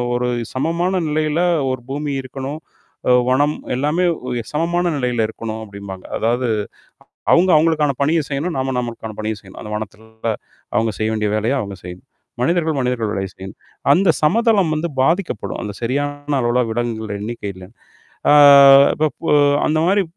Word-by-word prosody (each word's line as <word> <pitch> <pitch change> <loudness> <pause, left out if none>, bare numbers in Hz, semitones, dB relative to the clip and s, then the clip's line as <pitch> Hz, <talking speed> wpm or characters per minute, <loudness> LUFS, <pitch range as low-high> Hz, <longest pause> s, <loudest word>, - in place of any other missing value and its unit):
ஒரு 125 0 0 0.3
சமமான 170 +7 0 0.2
நிலையில 155 +2 0 0.3
ஒரு 125 -2 -5
பூமி 145 +1 -3
இருக்கணும். 135 +4 -6 0.5
அ - - +6 0.2
வனம் 145 +4 +2 0.2
எல்லாமே 150 +7 0 0.5
சமமான 170 +3 0
நிலையில 120 -4 0
இருக்கணும் 110 0 -6
அப்பிடிம்பாங்க. 100 -2 -9
அதாவது 120 +2 0 0.8
அவுங்க 180 +2 +5
அவுங்களுக்கான 155 -2 +3
பணிய 160 +4 +2
செய்யணும், 150 +4 -2
நாம 130 0 -1
நம்மக்கான 115 -2 -6
பணிய 110 0 -2
செய்யணும். 95 -2 -14
அந்த 105 - -8
வனத்த 110 +1 -6 0.5
அவங்க 110 0 +2
செய்ய 110 - 0
வேண்டிய 105 -1 -1
வேலைய 110 +5 0
அவுங்க 100 -4 -5
செய்யணும். 90 +6 -10 0.3
மனிதர்கள், 160 +2 +1
மனிதர்கள் 125 -4 -1
வேலை 95 -2 -2
செய்யும். 95 +1 -9 0.4
அந்த 185 +4 +3
சமதளம் 200 0 +3
வந்து 170 +3 -2
பாதிக்கப்படும். 170 +7 -1
அந்த 105 - -5
சரியான 145 +4 -2
அளவுல 120 +1 +2
விலங்குகள் 110 -2 -3
எண்ணிக்கை 110 -1 -5
இல்லன்னு. 95 +5 -14 0.5
ஆ - - +7 0.6
இப்ப 155 0 0
பு - - -4 0.4
அந்த 155 - +1
மாரி 195 +2 +3
130 Hz, 145 wpm, -19 LUFS, 110-155 Hz, 0.8 s, ஆ